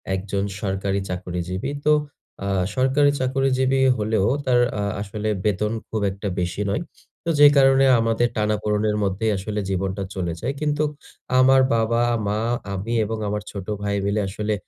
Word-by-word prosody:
একজন 100 +1 -2 0.2
সরকারি 95 0 -1
চাকরিজীবী। 90 +4 -4
তো 150 - +5 0.5
আ - - -2 0.3
সরকারি 135 +2 +3
চাকরিজীবী 130 0 +1 0.2
হলেও 105 -2 +1 0.2
তার 125 -1 +3 0.2
আ - - -1 0.2
আসলে 105 +1 -3 0.2
বেতন 105 +1 +1 0.2
খুব 110 -2 -2
একটা 100 +2 -6
বেশি 90 +4 -2
নয়। 130 - -1 0.4
তো - - +3
যে, 145 - +11
কারণে 135 0 +5
আমাদের 115 +1 +2
টানাপোড়নের 105 0 0
মধ্যেই 100 +3 0
আসলে 105 +2 -3
জীবনটা 95 +1 -2
চলে 85 -3 -2
যায়। 135 +4 -2
কিন্তু 150 0 +1 0.6
আমার 130 +1 +6
বাবা, 115 +1 +1 0.2
মা, 105 +1 0 0.3
আমি 105 +5 -3
এবং 110 +1 -3
আমার 105 0 -3
ছোট 100 -1 -7 0.2
ভাই 100 0 -1
মিলে 105 +1 +1
আসলে 105 +2 -2
105 Hz, 150 wpm, -23 LUFS, 100-130 Hz, 0.6 s, যে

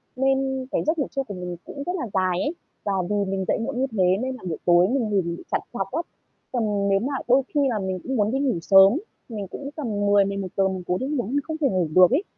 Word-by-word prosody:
Nên 265 0 0
cái - - 0
giấc 315 +2 +2
ngủ 280 - 0
trưa 275 - -1
của 210 - -8
mình 180 -1 -5
cũng 280 - -7
rất 355 - -2
là 300 -10 -3
dài 185 -2 +1
ấy. 300 +4 -1 0.3
Và 200 - -1 0.2
vì 210 - 0 0.2
mình 190 -1 -1
dậy - - +2
muộn 230 +2 -3
như 265 - +1
thế 205 -4 +1 0.2
nên 260 0 -2
là - - -13
buổi 165 - -3
tối 175 +1 +5
mình 255 +3 +1
ngủ 200 -2 +2
bị 170 0 -5
trằn - - +1
trọc 195 - -3
á. 315 +6 0 0.5
Còn 210 -5 0
nếu 195 0 +3
mà 265 +7 -2
đôi 260 +2 +5
khi - - +4
là 225 -4 -1
mình 190 -1 -3
cũng 265 - -3
muốn 210 -2 +2
đi 270 - 0
ngủ 265 -11 +1
sớm, 195 +3 +7 0.4
mình 210 -4 -5
cũng 275 +9 -7
tầm 300 -5 -4 0.2
10:00-11:00 200 -1 +2
mình 190 -1 -4
cố 180 - +1
đi 260 - -3
ngủ 280 -6 -1
nhưng 285 +3 +1
không 315 +2 -4
thể 290 -4 +2
ngủ 185 -6 +1
được 185 +2 +7
ấy. 290 +9 +2
215 Hz, 265 wpm, -24 LUFS, 190-270 Hz, 0.5 s, sớm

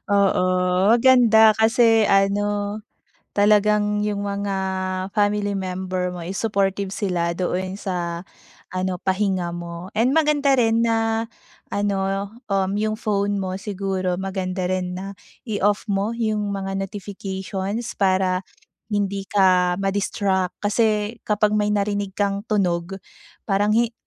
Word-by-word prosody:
Oo, 200 -2 +3 0.5
maganda 230 -3 +6
kasi 225 -1 +4
ano, 205 +1 +1 0.5
talagang 210 0 +3
yung 205 -1 -2
mga 200 -1 -2 0.6
family 205 -1 +1
member 185 -1 -3
mo 180 -1 -7
is 190 - -5
supportive 200 -2 0
sila 180 -4 -1
doon 185 +1 -2
sa 175 -3 -3 0.5
ano 185 -1 -1
pahinga 185 -3 0
mo. 170 +1 -7
And 235 +4 +3
maganda 295 -3 +3
rin 230 -1 +3
na 225 0 0 0.4
ano, 195 -1 -1 0.2
um, 195 -1 +1
yung 215 +1 -1
phone 205 -1 0
mo 185 -1 -3
siguro 190 -3 -2
maganda 190 -1 -3
rin 180 -1 -2
na 195 +1 -6 0.3
i-off 205 -1 0
mo 200 +2 0
yung 215 -3 -1
mga 195 -1 -3
notifications 195 +2 -4
para, 185 -1 +2 0.5
hindi 200 -2 -2
ka 185 -3 +3
ma-distract, 195 -1 -1
kasi 215 +1 +1
kapag 210 0 +1
may 210 0 +1
narinig 205 -1 -1
kang 200 -1 0
tunog, 185 -3 0 0.5
parang 205 0 +1
hi 235 0 +2
200 Hz, 120 wpm, -22 LUFS, 190-210 Hz, 0.6 s, maganda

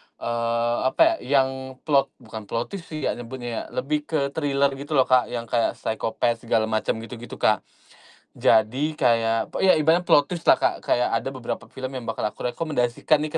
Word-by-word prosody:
eee, 115 0 -1
apa 330 - +3
ya, 140 -2 +3
yang 130 0 -6
plot 140 -3 +3
bukan 110 -3 -10
plot 115 +3 -3
twist 195 -4 -7
sih 155 -2 -6
ya, - - +1
nyebutnya 120 -1 -5
ya, - - -14
lebih 150 +3 -1
ke 140 -3 0
thriller 140 -2 +1
gitu 145 +2 -4
loh, 135 - +6
Kak, 130 -1 +3
yang 120 -1 -4
kayak 115 0 0
psychopath 115 +1 -2
segala 110 -1 +3
macem 110 -1 0
gitu-gitu, 115 -1 -9
Kak. 110 - +2 0.8
Jadi 125 +8 +2
kayak 115 -1 +2
p - - -2
iya 190 - +6
ibaratnya 160 +3 +3
plot 145 -5 +4
twist 170 - -6
lah, - - +6
Kak, - - 0
kayak 125 -1 +1
ada - - -4
beberapa 120 -3 -6
film 130 -1 -6
yang 130 - -5
bakal 115 -1 -3
aku 120 +3 -3
rekomendasikan 150 0 0
nih 155 - -3
125 Hz, 195 wpm, -24 LUFS, 115-145 Hz, 0.8 s, loh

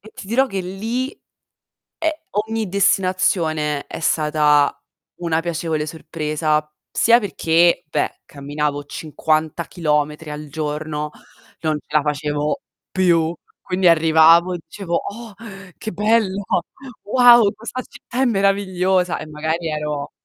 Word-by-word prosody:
e 220 - -14
ti - - -9
dirò 250 +6 +2
che 195 -6 -3
lì, 225 +8 -3 0.9
ehm 320 -2 +1 0.4
ogni 225 -1 -2
destinazione 180 -6 +1
è - - -7
stata 150 -2 +2 0.4
una 165 -2 +1
piacevole 165 -2 -2
sorpresa, 155 -1 -2 0.2
sia 235 +1 +5
perché, 170 -5 +2
beh, - - -2
camminavo 145 0 -3
50 155 +2 -2
chilometri 150 -2 -1
al 150 0 -6
giorno, 150 0 -3 0.5
non 155 -2 0
ce - - -30
la - - +3
facevo 150 - -1 0.3
più. 170 -3 +2 0.3
Quindi 185 -1 +1
arrivavo 165 +2 +6
e 175 - -4
dicevo: 175 0 -4
"Oh, 225 +1 -7 0.4
che 220 - -5
bello, 205 0 +1 0.6
wow, 240 -1 +6
questa 235 +3 -6
città 245 0 -6
è - - +4
meravigliosa". 190 -4 +1
E - - -7
magari 160 +2 -2
ero 150 -2 -3
165 Hz, 120 wpm, -20 LUFS, 150-195 Hz, 0.9 s, arrivavo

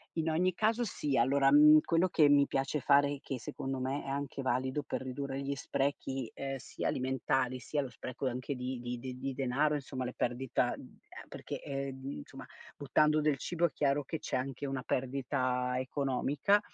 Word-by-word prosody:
In 160 0 0
ogni 180 +3 +2
caso 220 +5 +1
sì 150 - -1
allora, 135 +3 +4
mhmm, 150 +1 +9
quello 170 +2 +2
che 155 -4 +5
mi 145 -1 +6
piace 135 +1 -1
fare, 140 +1 +4
che 130 -3 -5
secondo 135 +3 -4
me 135 +3 -2
è 135 - -6
anche 140 0 -3
valido 130 +2 0
per - - -3
ridurre 135 +1 -4
gli 140 0 -2
sprechi, 135 -3 -2
ehm, 135 0 -4
sia 130 - -5
alimentari, 130 0 0
sia 145 +3 -2
lo 135 - -5
spreco 125 +3 -5
anche 130 +2 -3
di 125 0 -4
di 120 0 -4
di 125 0 -6
di 135 +1 -3
denaro, 140 +3 +1
insomma 135 -2 -4
le 125 - -4
perdita, 125 +1 0
uhm, - - -14 0.3
perché, - - -6
ehm, 135 -1 -4
insomma 75 - -9 0.3
buttando 150 +2 +3
del 150 -2 +2
cibo 170 +4 0
è 165 - +1
chiaro 140 +1 +1
che 160 +3 -4
c'è - - -3
anche 135 +2 -3
una 135 -2 -3
perdita 125 -1 -1
economica, 140 +8 +1
135 Hz, 185 wpm, -32 LUFS, 130-145 Hz, 0.3 s, mhmm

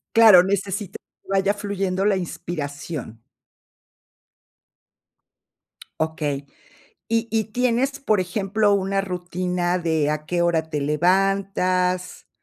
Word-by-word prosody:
Claro, 215 -6 +9
necesita 195 0 -2 0.3
que - - -28
vaya 195 +1 +2
fluyendo 195 -2 -2
la 205 -2 +3
inspiración. 145 -8 -6 2.8
Okey. 150 -3 -2 0.6
Y 230 0 0
y, 220 -1 +1
¿tienes, 250 +4 0
por 215 -7 +1
ejemplo, 200 +3 +1
una 195 0 0
rutina 180 -1 -2
de 160 -3 0
a 150 0 -3
qué 175 -1 0
hora 160 -2 +1
te 150 -2 -2
levantas, 185 +3 0
185 Hz, 100 wpm, -23 LUFS, 170-200 Hz, 2.8 s, Claro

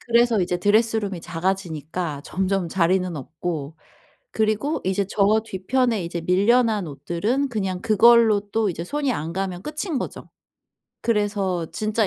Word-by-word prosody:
그래서 235 -2 +3
이제 180 0 0
드레스룸이 205 -1 +1
작아지니까 165 -3 -3
점점 190 0 -1
자리는 180 0 +1
없고 155 +1 -5 0.6
그리고 220 +8 0
이제 190 +1 0
저 215 +2 +3
뒤편에 225 +1 0
이제 170 0 -4
밀려난 205 +2 +2
옷들은 210 - -1
그냥 190 -5 -2
그걸로 225 -1 +5
또 220 -2 +1
이제 170 -2 -4
손이 280 +7 -1
안 160 -3 -4
가면 185 -1 -3
끝인 305 -1 -3
거죠. - - -7 0.7
그래서 205 -6 0
진짜 215 +2 0
195 Hz, 305 characters per minute, -23 LUFS, 175-225 Hz, 0.7 s, 그걸로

